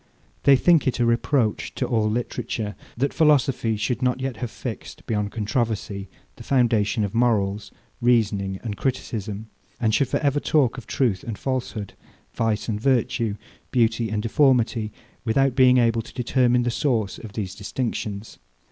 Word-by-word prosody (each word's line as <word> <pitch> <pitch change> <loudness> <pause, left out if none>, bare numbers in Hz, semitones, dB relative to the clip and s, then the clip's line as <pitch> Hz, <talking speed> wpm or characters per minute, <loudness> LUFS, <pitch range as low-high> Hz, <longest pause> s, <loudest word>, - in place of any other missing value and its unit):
They 140 - +8
think 165 +1 +4
it 130 - 0
a 120 - +3
reproach 115 0 +1
to - - -1
all 110 -2 +1
literature, 115 -2 -3 0.2
that 140 +4 0
philosophy 135 -7 +3
should 115 +3 -1
not 125 0 +1
yet 130 -3 -3
have 120 0 -4
fixed, - - -7
beyond 105 -2 -1
controversy, 105 -3 -2 0.3
the - - -10
foundation 115 -4 +2
of 100 - -3
morals, 105 -4 +1 0.3
reasoning, 105 -5 +2
and 110 -4 -3
criticism; 110 -3 -3 0.3
and 110 -3 +1
should 135 +4 +3
for - - 0
ever 145 0 +2
talk 135 -4 +2
of 120 - -13
truth 110 -9 0
and 115 -3 -5
falsehood, 125 -6 -3 0.4
vice 110 -2 -1
and 105 -2 -2
virtue, 115 -4 +1 0.3
beauty 115 -2 +1
and 105 0 -2
deformity, 120 -3 +2 0.3
without 130 +3 +2
being 130 -1 +5
able 115 -2 +3
to 115 - -13
determine 125 0 +2
the 120 - 0
source 115 -6 0
of 110 -3 -10
these 100 -4 -4
distinctions. 105 0 -4
115 Hz, 155 wpm, -24 LUFS, 105-125 Hz, 0.4 s, They